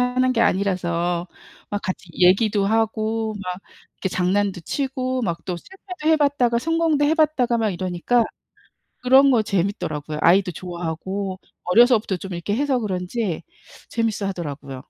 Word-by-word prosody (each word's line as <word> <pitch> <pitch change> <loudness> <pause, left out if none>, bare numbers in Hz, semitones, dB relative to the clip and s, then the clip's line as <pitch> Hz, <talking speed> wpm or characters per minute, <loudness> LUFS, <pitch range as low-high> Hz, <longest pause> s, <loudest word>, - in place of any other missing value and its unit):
하는 250 +1 +2
게 230 - 0
아니라서 175 -4 0 0.4
막 205 - -3
같이 185 -1 -5
얘기도 195 +3 +3
하고 220 0 0
막 180 0 -4 0.4
이렇게 190 - -3
장난도 190 +1 0
치고 260 - -2
막 170 -6 -1
또 180 - -3
실패도 365 - -7
해봤다가 280 -6 +2
성공도 325 +1 +1
해봤다가 295 -6 +2
막 220 -2 +1
이러니까 185 +6 0 0.8
그런 270 +2 +6
거 230 -4 +3
재밌더라고요. 170 -6 -2
아이도 180 +2 +4
좋아하고 180 +3 -5 0.2
어려서부터 220 0 +4
좀 190 +1 -7
이렇게 175 +4 -3
해서 270 0 +1
그런지 185 -2 -3 0.5
재밌어하더라고요. 190 - -3
205 Hz, 335 characters per minute, -22 LUFS, 180-250 Hz, 0.8 s, 그런